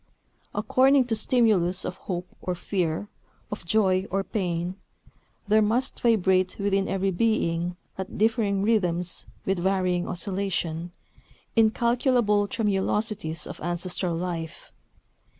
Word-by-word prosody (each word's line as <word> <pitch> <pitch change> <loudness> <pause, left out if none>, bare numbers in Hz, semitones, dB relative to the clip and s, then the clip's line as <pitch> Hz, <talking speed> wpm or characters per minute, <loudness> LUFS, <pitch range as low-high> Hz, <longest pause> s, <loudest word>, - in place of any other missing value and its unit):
According 265 0 +4
to 230 -2 0
stimulus 210 -6 +2
of 180 - -4
hope 180 -1 -4
or 180 - -2
fear, 175 0 -2 0.4
of 210 - -5
joy 190 -1 +2
or 195 +1 0
pain, 180 -4 -2 0.7
there 215 +1 +5
must 235 +5 0
vibrate 190 -5 +2
within 195 -1 +1
every 195 0 0
being, 175 -4 0 0.2
at 190 - -5
differing 210 -2 +2
rhythms, 180 -5 0 0.2
with 190 -1 0
varying 185 -1 +1
oscillation, 180 -3 -2 0.6
incalculable 230 -2 +3
tremulosities 205 -5 -1
of - - -8
ancestral 175 +1 -1
life. 165 -2 -5
195 Hz, 110 wpm, -26 LUFS, 180-215 Hz, 0.7 s, there